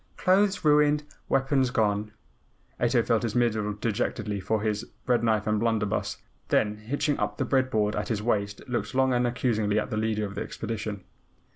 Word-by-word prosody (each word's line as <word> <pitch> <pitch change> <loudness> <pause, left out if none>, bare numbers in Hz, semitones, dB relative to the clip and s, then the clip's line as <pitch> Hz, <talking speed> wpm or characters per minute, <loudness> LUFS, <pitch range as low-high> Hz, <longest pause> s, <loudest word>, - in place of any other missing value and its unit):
Clothes 195 0 +2
ruined, 150 0 +4 0.3
weapons 135 -1 +2
gone," 105 -3 0 0.7
(Ato 120 0 +3
felt 115 -1 +2
his 115 -3 -2
middle 110 -4 +1
dejectedly 105 -1 -2
for 110 +2 -1
his 105 0 -1 0.2
bread 120 -2 +2
knife 110 -2 +2
and 105 0 +1
blunderbuss), 110 -2 0 0.3
then 105 0 +1
hitching 140 +7 -1
up 105 0 -2
the - - 0
bread 130 -1 +2
board 105 -3 +1
at 105 - -2
his 110 -3 -1
waist 100 -3 -1
looked 125 +1 -3
long 130 -1 +3
and 125 0 +2
accusingly 110 -4 0
at 110 - -1
the 105 - -1
Leader 110 -1 0
of 100 - -6
the 100 - -4
Expedition. 105 -3 -5
110 Hz, 175 wpm, -27 LUFS, 105-125 Hz, 0.7 s, ruined